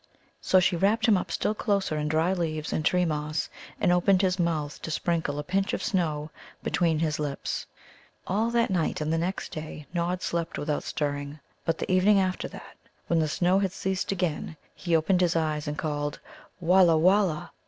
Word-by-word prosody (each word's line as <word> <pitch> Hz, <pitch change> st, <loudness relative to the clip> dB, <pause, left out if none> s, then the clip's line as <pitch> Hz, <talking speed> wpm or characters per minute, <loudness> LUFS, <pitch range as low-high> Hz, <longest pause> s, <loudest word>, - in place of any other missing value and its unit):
So 185 Hz, -, +4 dB
she 180 Hz, 0 st, +2 dB
wrapped 200 Hz, +6 st, +2 dB
him 220 Hz, -, +6 dB
up 185 Hz, -, -2 dB
still -, -, 0 dB
closer 200 Hz, -7 st, 0 dB
in 150 Hz, 0 st, -1 dB
dry 160 Hz, +4 st, +2 dB
leaves 160 Hz, -4 st, -2 dB
and 155 Hz, -, -1 dB
tree 180 Hz, +3 st, +3 dB
moss, 150 Hz, -1 st, -2 dB, 0.3 s
and -, -, +3 dB
opened 185 Hz, +2 st, +3 dB
his 185 Hz, 0 st, +1 dB
mouth 155 Hz, -4 st, -1 dB
to -, -, -5 dB
sprinkle 160 Hz, -2 st, -1 dB
a 150 Hz, -, -3 dB
pinch 195 Hz, +5 st, 0 dB
of -, -, -2 dB
snow 155 Hz, -5 st, -1 dB, 0.3 s
between 165 Hz, -3 st, +1 dB
his 155 Hz, -1 st, -1 dB
lips. 145 Hz, -2 st, -3 dB, 0.6 s
All 215 Hz, +5 st, 0 dB
that 235 Hz, -3 st, +1 dB
night 170 Hz, -4 st, 0 dB
and 155 Hz, +1 st, -1 dB
the 165 Hz, -, +1 dB
next 180 Hz, +3 st, -3 dB
day 155 Hz, -2 st, -7 dB
Nod 180 Hz, +1 st, -1 dB
slept 170 Hz, -2 st, -2 dB
without 150 Hz, 0 st, -1 dB
stirring. 145 Hz, 0 st, -3 dB, 0.3 s
But 165 Hz, 0 st, 0 dB
the -, -, -3 dB
evening 195 Hz, +2 st, +5 dB
after 185 Hz, -1 st, -1 dB
that, -, -, -12 dB, 0.3 s
when 170 Hz, -, +1 dB
the 155 Hz, -, +2 dB
snow 180 Hz, +5 st, +2 dB
had 195 Hz, -2 st, -1 dB
ceased 190 Hz, 0 st, -2 dB
again, 175 Hz, -4 st, -2 dB, 0.2 s
he 170 Hz, -3 st, -1 dB
opened 180 Hz, +3 st, +2 dB
his 175 Hz, -2 st, +2 dB
eyes 155 Hz, -2 st, 0 dB
and 150 Hz, 0 st, -3 dB
called 145 Hz, -1 st, -2 dB, 0.4 s
"Wallah, 175 Hz, -1 st, +5 dB
wallah!" 180 Hz, -1 st, +2 dB
170 Hz, 190 wpm, -27 LUFS, 155-185 Hz, 0.6 s, him